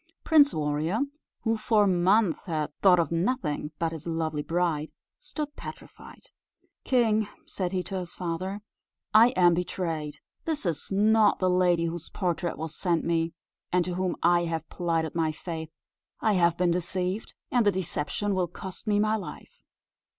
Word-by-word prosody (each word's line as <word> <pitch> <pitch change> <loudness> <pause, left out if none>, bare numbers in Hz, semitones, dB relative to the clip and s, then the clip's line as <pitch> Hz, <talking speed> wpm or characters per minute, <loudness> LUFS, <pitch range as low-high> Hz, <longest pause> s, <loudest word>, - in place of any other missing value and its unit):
Prince 295 -3 +6
Warrior, 155 - -1 0.4
who 225 -1 +1
for 215 -1 +3
months 185 0 +3
had 155 -4 -2
thought 185 -2 +7
of 170 -1 +1
nothing 165 - -1
but 165 -1 -1
his 160 0 -7
lovely 160 -2 -1
bride, 165 -2 0 0.3
stood 300 -10 -5
petrified. - - -11 0.5
"King," 220 -4 +2 0.2
said 180 -2 -3
he 185 -1 -1
to 190 0 -4
his 175 -1 -7
father, 185 +3 -3 0.5
"I 220 +2 +8
am 175 -1 +5
betrayed! 165 -3 -3 0.3
this 315 -8 -2
is 170 +1 -2
not 215 +2 +4
the 185 -1 +2
lady 180 -2 +3
whose 170 0 -4
portrait 175 -2 -2
was 160 0 -5
sent 170 -4 0
me, 165 -1 0 0.4
and 180 -1 +2
to 180 - -3
whom 185 0 -1
I 175 0 +4
have 165 -1 -3
plighted 165 -3 -1
my 160 -2 +1
faith; 160 0 -6 0.5
I 215 - +2
have 170 -2 +3
been 180 -1 +2
deceived, 180 +3 -2 0.2
and 245 -2 +3
the 205 - +4
deception 190 +2 -2
will 185 -2 +1
cost 190 +4 -9
me 205 -1 +3
my 215 +1 +2
life." 180 -9 -8
180 Hz, 160 wpm, -27 LUFS, 165-205 Hz, 0.5 s, I